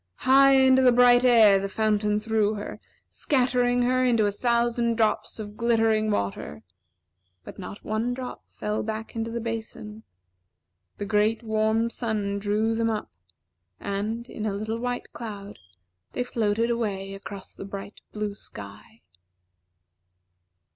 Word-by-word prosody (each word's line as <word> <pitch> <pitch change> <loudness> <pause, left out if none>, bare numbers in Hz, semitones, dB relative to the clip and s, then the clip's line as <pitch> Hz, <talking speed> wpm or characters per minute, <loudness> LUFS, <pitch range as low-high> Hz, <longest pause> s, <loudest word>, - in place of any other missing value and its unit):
High 275 +1 +7
into 265 -1 +5
the 255 -1 +6
bright 245 0 +6
air 225 -5 +6
the 195 +1 -3
fountain 210 0 +1
threw 215 -1 +1
her, 205 - -7 0.3
scattering 245 -2 +1
her 255 +1 +2
into 235 -4 +3
a 205 - +1
thousand 235 +1 +1
drops 220 -1 0
of 210 -1 -7
glittering 225 -2 +2
water; 100 - -3 0.8
but - - -11
not 195 +2 -8
one 225 +3 -1
drop 255 -1 -7
fell 210 0 -2
back 220 +1 -5
into 225 0 -2
the 235 +1 -3
basin. 220 -1 -6 1.0
The 205 - -4
great, 215 +2 +1
warm 220 +1 +1
sun 210 -4 -2
drew 210 +2 0
them 225 0 0
up; 215 -1 -3 0.7
and, 215 +4 -3
in 215 -3 -5
a 205 - -1
little 220 +2 -3
white 245 0 -4
cloud, 205 -3 -8 0.5
they 250 - -1
floated 230 -1 0
away 200 -4 -2
across 195 0 -9
the - - -9
bright 200 +1 -8
blue 210 -1 -3
sky. 105 - -11
220 Hz, 140 wpm, -26 LUFS, 205-235 Hz, 1.0 s, High